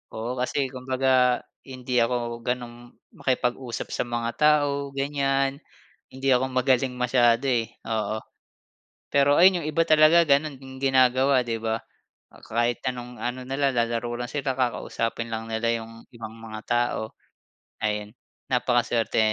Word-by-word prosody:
Oo, 115 +3 -3
kasi 135 +2 0
kumbaga 130 -1 +1 0.2
hindi 125 -1 -2
ako 120 0 -1
ganong 120 -1 -5 0.2
makipag-usap 125 -1 -2
sa - - -1
mga 120 -1 -2
tao 145 -2 +3
ganyan. 135 0 0 0.5
Hindi 135 +1 -2
ako 130 +1 +1
magaling 130 0 +2
masyado, 125 0 +3
eh, 120 -3 0 0.2
oo. 110 -1 -1 0.9
Pero 140 0 +4
ayun 180 0 +6
yung 150 - -3
iba 165 +2 +2
talaga 155 +2 +6
gano'n 145 0 +2
yung 130 0 -11
ginagawa, 130 0 +4
'di 115 -1 -2
ba? 110 0 0 0.7
Kahit 120 +1 0
anong 125 -1 -7
ano 125 +1 -3
nila 135 +1 +1
lalaro 120 0 -1
lang 120 - -3
sila, 140 -3 -2
kakausapin 115 -2 -2
lang 110 0 -4
nila 115 +1 0
yung 115 0 -13
ibang 115 -2 -8
mga 110 -1 -8
tao 120 -2 0 0.7
ayun. 105 -1 -2 0.4
Napakasuwerte, 120 -2 +1
125 Hz, 135 wpm, -25 LUFS, 115-135 Hz, 0.9 s, ayun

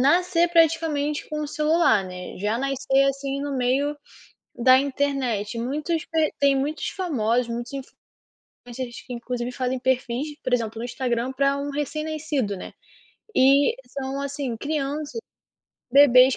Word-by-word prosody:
nascer 345 +4 +3
praticamente 320 -3 +2
com 305 0 -3
o 295 - -4
celular, 305 - +3
né, 180 0 -8
já 210 +4 0
nascer, 275 0 +2
assim, 275 0 -2
no 285 -1 -3
meio 270 +4 +1 0.6
da 255 +2 +6
internet. 265 -6 -1
Muitos 300 +7 -2
pe 320 -2 +1
tem 280 -1 +4
muitos 290 +4 -2
famosos, 250 - 0
muitos 235 +3 -5
influ 270 -1 -7 0.7
mas 240 -1 -10
eles, 240 -2 -5
que - - -13
inclusive 240 +1 -4
fazem 255 0 -2
perfis, 260 +3 -1
por 255 -1 -1
exemplo, 225 -2 0
no - - -4
Instagram 245 0 -1
para 275 +1 +2
um 285 +1 -3
recém-nascido, 295 -5 -2
né. - - -9 0.6
E 275 +2 +5
são 270 +1 -4
assim, 280 -4 -3
crianças, 295 - -3 0.7
bebês 260 -2 +7
275 Hz, 145 wpm, -24 LUFS, 245-295 Hz, 0.7 s, bebês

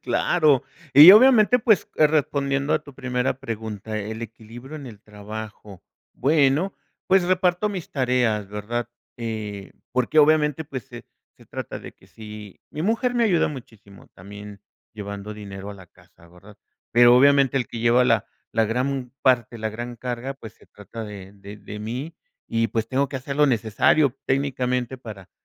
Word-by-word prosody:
Claro, 150 -6 +2 0.3
y 150 +6 +11
obviamente, 245 0 +6
pues, 220 -4 +2
eh, 155 - +6
respondiendo 140 -2 0
a - - -1
tu 140 - -13
primera 125 0 -2
pregunta, 110 -3 -5
el 110 +2 -6
equilibrio 115 +6 -10
en 140 -3 -9
el 105 -4 -11
trabajo. 105 -2 -10 0.3
Bueno, 150 +5 +2 0.3
pues, 190 -1 +4
reparto 185 +2 +1
mis 185 -5 -6
tareas, 125 -6 0
¿verdad? 110 +3 -4 0.3
Eh, 110 -4 -6 0.2
porque 125 +5 +1
obviamente, 150 0 +3
pues, 135 -4 -7
se 120 -3 -11 0.3
se - - -20
trata - - -6
de - - -11
que - - -24
si 105 -2 -11
mi 155 - -5
mujer 230 +5 0
me 235 -1 +2
ayuda 180 -6 +2
muchísimo 110 -8 -12
también 100 +1 -12 0.3
llevando 100 -1 -7
dinero 100 -1 -8
a 100 - -8
la 95 -2 -14
casa, 85 +1 -23
¿verdad? 95 +4 -17 0.3
Pero 120 +1 +7
obviamente 140 0 +4
el 125 -4 0
que 115 - -8
lleva 120 +2 +3
la 115 -4 +2 0.3
la 115 -1 +2
gran 125 +2 -2
parte, 120 -2 +2
la 110 0 -3
gran 120 +2 -7
carga, 125 +2 -5
pues, 110 -5 -11
se - - -23
trata 105 +3 -10
de 100 -2 -10
de 100 +1 -12
de 105 0 -9
mí. 125 +10 -5 0.4
Y 115 0 +2
pues, 115 +1 -2
tengo 135 +3 0
que 135 - -5
hacer 140 +2 -6
lo 150 0 +4
necesario 125 +4 +2
técnicamente 130 -2 -1
para 105 -6 -11
120 Hz, 165 wpm, -23 LUFS, 105-140 Hz, 0.4 s, y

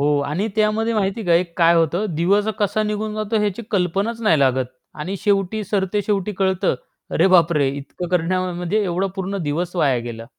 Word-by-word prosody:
हो 145 0 +2
आणि 170 +9 -1
त्यामध्ये 220 +1 +1
माहिती 200 0 0
आहे 170 +1 +5
का 170 -2 -13
काय 170 -1 +5
होतं? 170 +5 +1
दिवस 195 +6 +2
कसा 210 +1 +1
निघून 210 0 -2
जातो 215 0 -1
याची 210 +2 -2
कल्पनाच 200 +4 0
नाही 185 -8 +4
लागत 130 -1 +2 0.4
आणि 185 +6 -3
शेवटी 205 0 +1
सरते 200 0 -1
शेवटी 205 0 -1
कळत 190 -2 0 0.5
अरे, - - +3
बापरे! 170 -6 +4
इतकं 145 +5 -6
करण्यामध्ये 180 +2 0
एवढा 185 +1 0
पूर्ण 190 +1 -3
दिवस 165 +4 -2
वाया 140 -7 +2
गेला. 115 -1 -7
185 Hz, 175 wpm, -21 LUFS, 170-210 Hz, 0.5 s, आहे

